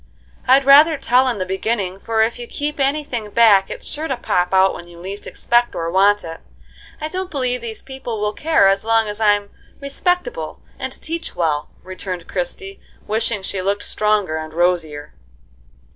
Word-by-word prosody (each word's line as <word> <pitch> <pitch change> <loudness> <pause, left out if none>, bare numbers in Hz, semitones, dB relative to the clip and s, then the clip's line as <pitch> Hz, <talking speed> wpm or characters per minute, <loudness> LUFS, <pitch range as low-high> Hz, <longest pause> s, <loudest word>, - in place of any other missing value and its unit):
"I'd 265 +2 +5
rather 295 +3 +7
tell 255 0 +3
in 245 -4 0
the 185 - -2
beginning, 190 0 -2
for 220 +1 +1
if 230 +2 -2
you 240 - -7
keep 295 +3 -4
any 280 +3 +1
thing 240 -7 -5
back 205 -3 +5
it's - - -7
sure 310 +2 -4
to 265 - -2
pop 180 -6 0
out 190 0 +4
when 175 - -9
you 175 0 -14
least 195 +4 -7
expect 240 0 +1
or 165 0 -2
want 200 +3 +4
it. 165 0 -8 0.6
I 305 - -3
don't 370 +3 -4
believe 250 -4 -2
these 225 -2 -7
people 265 -4 -6
will 210 0 -1
care 315 -8 +3
as 195 0 +2
long 225 0 +2
as 210 0 -5
I'm 205 -2 +2 0.3
respectable 360 - -2 0.2
and - - -4
teach 330 +1 -5
well," 155 -4 -1
returned 185 -2 -6
Christie, 390 - -4 0.3
wishing 215 -1 -1
she 190 0 -3
looked 200 +2 -1
stronger 210 -6 0
and 155 0 -7
rosier. 165 -4 0
215 Hz, 180 wpm, -20 LUFS, 190-265 Hz, 0.6 s, rather